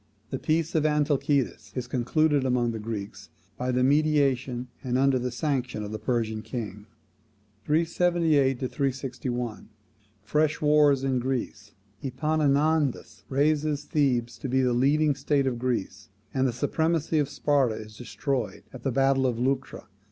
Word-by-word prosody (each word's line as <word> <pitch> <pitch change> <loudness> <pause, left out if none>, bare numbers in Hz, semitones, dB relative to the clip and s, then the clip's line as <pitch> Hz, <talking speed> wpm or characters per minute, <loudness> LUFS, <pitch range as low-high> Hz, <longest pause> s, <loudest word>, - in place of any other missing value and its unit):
The - - -2
peace 160 +1 0
of 155 - +2
Antalcidas 145 -2 0
is 125 -2 -2
concluded 140 +4 +1
among 125 -2 +1
the 110 - -5
Greeks 100 -2 -6 0.3
by 125 +2 -2
the 125 0 +1
mediation, 135 -3 +2 0.2
and 125 -1 0
under 135 -1 +3
the 125 +1 -2
sanction, 125 -4 -2
of 105 - -6
the 110 - -4
Persian 110 -1 -1
king. 105 -3 -6 0.8
378 160 -4 +2
to 130 - 0
361. 125 -3 -3 0.5
Fresh 150 +6 +1
wars 150 -2 +4
in 130 -2 +1
Greece. 120 -5 -4 0.3
Epaminondas 145 -2 0
raises 150 +1 +1
Thebes 125 -5 0
to 135 - -4
be 130 +1 +2
the 125 -1 +2
leading 145 +4 +3
state 140 0 0
of 125 -3 -1
Greece, 105 -5 -3 0.2
and 130 0 +2
the - - 0
supremacy 160 +5 0
of 145 -2 0
Sparta 140 -6 +1
is 110 0 -9
destroyed 125 0 -3
at 130 - -9
the 135 - -1
battle 135 +1 +3
of 120 -2 -1
Leuctra. 130 +2 -2
135 Hz, 145 wpm, -27 LUFS, 120-150 Hz, 0.8 s, wars